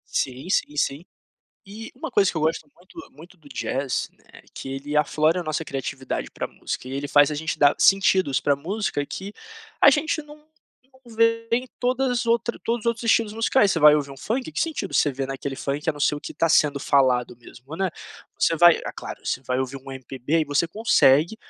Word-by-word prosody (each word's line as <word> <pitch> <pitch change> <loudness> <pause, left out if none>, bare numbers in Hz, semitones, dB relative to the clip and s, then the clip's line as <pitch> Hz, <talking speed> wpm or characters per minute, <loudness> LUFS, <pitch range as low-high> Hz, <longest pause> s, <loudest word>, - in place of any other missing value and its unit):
Sim, 130 +4 -2
sim, 150 -6 0
sim. 145 +3 -1 0.6
E 215 +3 -10
uma - - -6
coisa 195 -2 +3
que - - -10
eu - - 0
gosto 155 -1 -1
muito 180 +2 -18
muito 170 +6 -15
do 150 -4 -18
jazz, 135 0 -3
né, - - -19
que - - -8
ele 140 +2 -4
aflora 155 +3 +2
a - - -4
nossa 155 +1 -2
criatividade 135 -3 -4
pra - - -5
música 130 - -6
e - - -7
ele 140 +1 -3
faz 145 0 +4
a 150 - -3
gente 160 +1 -3
dar 145 -1 +4
sentidos 190 -7 +3
pra 140 -1 +1
música 170 -2 -3
que 195 +2 -7 0.5
a - - +8
gente 310 +3 0
não 300 0 -16 0.6
não 230 - -13
vê 230 0 +2
em 250 +2 +1
todas 250 0 0
outras 235 0 0
todos 235 +1 -1
os - - -9
outros 235 0 0
estilos 225 -2 +2
musicais. 225 -2 +3
Você 165 - +1
vai 150 -1 +7
ouvir 140 -2 -1
um 135 - -10
funk, 245 - -3
que - - -4
sentido 325 -2 -3
você 145 - +3
vê 135 +1 -4
naquele 135 0 -5
funk 145 +4 -4
a - - +3
não 145 - -12
ser 145 - +2
o 145 - -6
que - - -8
tá 165 - 0
sendo 145 -2 +3
falado 130 -4 +2
mesmo, 125 +5 -12
né? 190 0 -1 0.5
Você 165 - +2
vai 175 +1 +6
ah, - - -4
claro, - - -9
você - - -2
vai 125 0 -2
ouvir 130 +1 -3
um 135 0 -10
MPB 130 +4 -2
e 155 - +1
você 145 +3 +1
consegue 170 -3 +3
155 Hz, 220 wpm, -23 LUFS, 140-215 Hz, 0.6 s, a